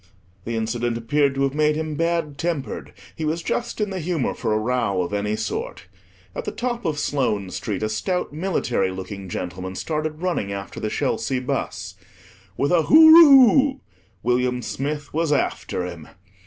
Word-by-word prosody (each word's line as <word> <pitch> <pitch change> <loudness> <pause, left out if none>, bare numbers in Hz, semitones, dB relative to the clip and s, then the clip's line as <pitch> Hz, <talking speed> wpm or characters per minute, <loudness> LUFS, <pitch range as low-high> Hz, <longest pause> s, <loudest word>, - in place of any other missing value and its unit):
The 115 - -3
incident 115 +1 -1
appeared 140 +4 +1
to 135 - 0
have 135 -1 0
made 150 0 +2
him 155 0 -3
bad 165 -2 -1
tempered; 165 -5 -3 0.2
he 160 - -5
was 160 +2 -1
just 240 -1 -3
in 210 -2 -1
the 190 - -3
humour 165 -4 -1
for - - -3
a 110 - +2
row 110 -5 0
of 100 - -5
any 105 +1 -1
sort. 110 -4 -4 0.5
At - - -5
the - - -2
top 240 -2 -3
of 155 -3 -1
Sloane 115 -10 -1
Street 105 +1 -4
a - - +1
stout 160 - -2
military 150 - 0
looking 95 +1 -7
gentleman 90 +2 -5
started 155 - -3
running 170 - -1
after 100 0 -6
the 110 - -2
Chelsea 115 +4 -1
bus. 125 - -3 0.6
With 140 - +1
a 175 -2 +4
"Hooroo" 285 - +8 0.4
William 125 0 +1
Smith 145 +4 -4
was 160 0 0
after 135 -9 -1
him. 85 -4 -8
140 Hz, 170 wpm, -23 LUFS, 110-165 Hz, 0.6 s, Hooroo